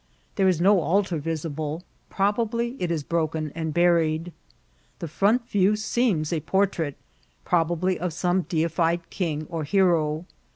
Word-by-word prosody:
There 195 -1 +3
is 180 -4 +2
no 195 +3 +5
idtar 180 0 +1
visible; 155 +1 -4 0.3
probably 230 +4 0
it 180 - 0
is 160 -3 -1
broken 160 -1 -1
and 160 -1 -3
bnried. 170 0 +2 0.7
The 170 - -5
front 210 - +1
view 200 +1 +3
seems 215 -7 0
a 165 - 0
portrait, 170 -4 0 0.5
probably 175 +2 +1
of 180 - -1
a<nne 175 +2 0
deified 170 +1 0
king 155 -5 -2
or 165 -2 -4
hero. 165 -2 +2
170 Hz, 135 wpm, -25 LUFS, 160-195 Hz, 0.7 s, no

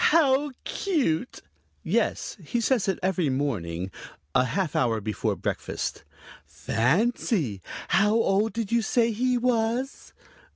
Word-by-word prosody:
How 290 -2 +4
cute!" 255 - -1 0.4
"Yes, - - 0
he 240 - -1
says 235 -2 +1
it 190 - +1
every 185 -5 +1
morning, 95 -10 -2 0.4
a 125 - +4
half 185 +2 -1
hour 115 -3 +2
before 105 0 -2
breakfast." - - -3 0.4
"Fancy! 150 - 0 0.3
How 210 +2 +4
old 215 -1 +2
did 230 -2 -3
you 235 0 +3
say 230 +1 +2
he 250 +3 +1
was?" 240 +2 -1
210 Hz, 120 wpm, -26 LUFS, -, 0.4 s, How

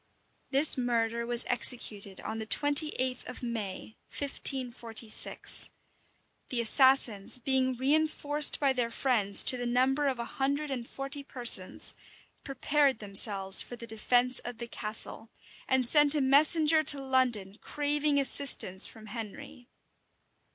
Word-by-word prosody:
[*] - - -44
This 275 0 +5
murder 235 -1 -4
was 240 0 +3
executed 210 -6 0
on 220 +1 -7
the 220 - -8
twenty 290 +5 +3
eighth 255 -1 -4
of 250 - -11
May, 220 -3 -8
1546. 245 -5 -3 0.8
The 250 - -4
assassins, 240 -3 +1
being 260 0 -3
reenforced 295 +2 +2
by 280 -3 -1
their 245 -2 -4
friends 230 -5 0
to 255 - +6
the 245 0 -6
number 265 +4 -2
of 265 -2 -4
a 235 - -7
hundred 280 +4 -5
and 245 -3 -7
forty 275 +1 -8
persons, 240 -8 +1 0.5
prepared 280 -1 -2
themselves 195 -1 +3
for 245 - -10
the 235 - -12
defence 245 +3 +1
of 245 -1 -10
the 235 0 -9
castle, 225 0 -4 0.4
and 260 -1 -1
sent 295 +3 +4
a 295 - -2
messenger 305 +3 +3
to 290 -2 +5
London 250 -7 -3
craving 295 0 -3
assistance 265 -9 +2
from 220 -1 -15
Henry. 225 +2 -12
250 Hz, 135 wpm, -26 LUFS, 230-280 Hz, 0.8 s, to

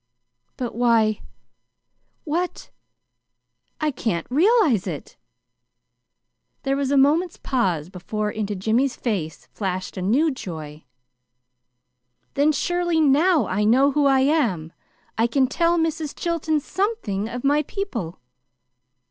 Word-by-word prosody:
"But, 245 -2 -4
why 225 -3 +2 1.0
what 345 +4 -3 1.1
I 305 -1 0
can't 220 -9 -2
realize 310 - +3
it!" 155 -6 -6 1.5
There 275 0 0
was 275 -1 -1
a 280 - +2
moment's 310 +6 +3
pause 185 - -1
before 210 +4 -4
into 210 -1 -3
Jimmy's 230 +7 +1
face 180 - -3
flashed 185 -2 -4
a - - -3
new 265 - +2
joy. 160 - -8 1.5
"Then, 290 +2 +3
surely 345 +2 0
now 310 +3 +4
I 210 +3 -1
know 260 +6 +4
who 290 0 +2
I 270 -1 +4
am! 235 - +1 0.5
I 230 - +4
can 265 +2 +2
tell 335 +6 +1
Mrs. 320 -2 -1
Chilton 325 -3 0
SOMETHING 295 - -2
of 245 +1 -6
my 290 +2 +3
people." 270 - -5
265 Hz, 115 wpm, -23 LUFS, 210-310 Hz, 1.5 s, now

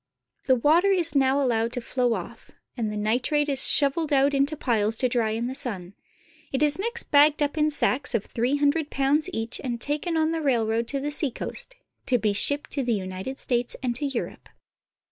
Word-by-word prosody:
The 260 - +5
water 310 +10 +3
is 350 -6 +1
now 270 0 +3
allowed 235 -3 0
to 250 - -2
flow 245 0 0
off", - - -9 0.3
and 225 -4 -2
the 210 - -5
nitrate 245 +8 0
is 275 -2 +1
shoveled 300 +2 +1
out 280 0 +3
into 280 +3 +1
piles 225 -5 0
to 255 - +3
dry 235 -3 0
in 225 +2 -2
the 255 - -3
sun. 205 -10 -5 0.6
It 270 +2 0
is 300 +3 +4
next 470 +3 -3
bagged 295 +1 +5
up 290 +1 -2
in 305 -1 +2
sacks 285 -2 +1
of 215 - -1
three 245 +4 -1
hundred 290 +1 +1
pounds 285 +5 +1
each 225 -6 -1
and 240 -3 -3
taken 300 +6 -1
on 315 0 +1
the 325 -1 -2
railroad 230 -4 0
to 275 - -2
the 290 +2 -3
seacoast, 295 - -4 0.3
to 250 - +3
be 215 -2 0
shipped 285 +8 0
to 275 - -1
the 240 -2 0
United 190 +6 -5
States 245 -1 -1
and 245 -2 -1
to 290 - -3
Europe. 270 -4 -6
270 Hz, 200 wpm, -25 LUFS, 235-295 Hz, 0.6 s, The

